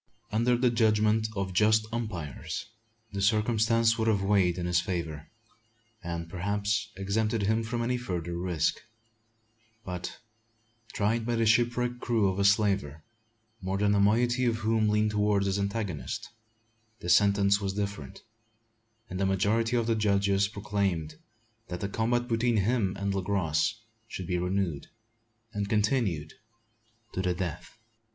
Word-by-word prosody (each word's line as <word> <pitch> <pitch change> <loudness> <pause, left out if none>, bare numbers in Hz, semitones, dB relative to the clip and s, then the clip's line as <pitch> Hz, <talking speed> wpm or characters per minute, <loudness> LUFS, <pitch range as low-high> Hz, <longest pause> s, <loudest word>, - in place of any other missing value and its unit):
Under 120 +3 +2
the 125 0 +2
judgment 110 -1 +2
of 95 -1 -2
just 110 +3 +4
umpires 95 - -4 0.5
this 100 0 +2
circumstance 115 +1 +2
would 110 - +1
have 100 -3 +2
weighed 95 -3 +2
in 90 - -3
his 90 0 +2
favour; 80 -5 -4 0.7
and, 85 -1 -4
perhaps, 100 +4 -1
exempted 105 +3 0
him 110 +3 +2
from 115 +1 -2
any 125 +1 0
further 90 -8 -4
risk; 85 -3 -1 1.0
but, 90 -1 -5 0.7
tried 110 +3 0
by 120 +1 -1
the 115 0 +1
shipwrecked 120 +2 +2
crew 115 -5 +1
of 95 +1 -3
a - - +2
slaver, 100 -7 +2 0.6
more 95 +1 -2
than 105 0 +2
a 100 - +3
moiety 120 +5 +3
of 115 -2 +2
whom 110 -1 +2
leaned 105 0 +2
towards 105 -1 +2
his 100 +1 0
antagonist, 100 - -3 0.7
the - - -7
sentence 100 +2 +4
was 95 -1 -2
different; 100 -1 -5 0.8
and 90 - -5
the 100 - +2
majority 110 +5 +1
of 120 -2 +1
the 115 - +2
judges 100 -2 +2
proclaimed 100 -7 -2 0.5
that 90 -1 -5
the 100 - -2
combat 120 +4 0
between 115 0 +1
him 100 -2 +1
and 100 0 -1
Le 95 - -1
Gros 90 -2 0 0.3
should 95 -5 -6
be 90 0 -1
renewed, 90 -4 -1 0.7
and 100 -1 -2
continued 105 - 0 0.8
to 95 - -1
the 90 -1 0
death. 90 +3 -5
100 Hz, 145 wpm, -28 LUFS, 95-110 Hz, 1.0 s, just